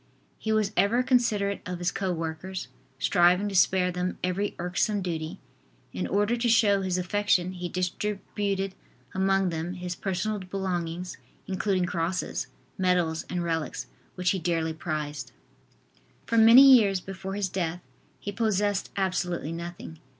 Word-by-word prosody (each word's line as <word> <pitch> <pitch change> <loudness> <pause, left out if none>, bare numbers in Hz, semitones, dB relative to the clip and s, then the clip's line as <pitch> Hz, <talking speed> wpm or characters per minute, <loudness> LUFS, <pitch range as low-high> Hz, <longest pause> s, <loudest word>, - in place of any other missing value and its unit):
He 220 - -2
was 215 -2 +2
ever 235 +5 +3
considerate 215 -6 +1
of 180 -1 -4
his 175 0 -1
co 190 -2 -2
workers, 165 0 -4 0.3
striving 180 +7 +3
to 195 - -5
spare 180 0 +4
them 180 +1 -2
every 185 +3 -1
irksome 185 +3 0
duty. 160 -3 -4 0.6
In 90 0 -2
order 205 +4 +1
to 240 0 0
show 205 -3 +4
his 185 -1 -1
affection 185 -1 +1
he 180 -1 -5
distributed 195 +1 -2 0.4
among 195 0 +2
them 165 +1 -3
his 180 -1 -4
personal 195 +3 -2
belongings, 180 -2 -3 0.3
including 190 -1 0
crosses, 175 +1 -2 0.3
medals 175 -3 +1
and 180 -1 -2
relics, 165 -2 -2 0.3
which 180 -1 +1
he 190 - -1
dearly 165 -1 0
prized. 150 -5 -4 0.9
For 230 - -1
many 230 +4 +9
years 200 -5 +3
before 190 +1 -6
his 205 -1 0
death 180 -2 -3 0.4
he 205 - -5
possessed 205 -2 0
absolutely 180 -4 -1
nothing. 170 -1 -7
185 Hz, 140 wpm, -27 LUFS, 175-200 Hz, 0.9 s, many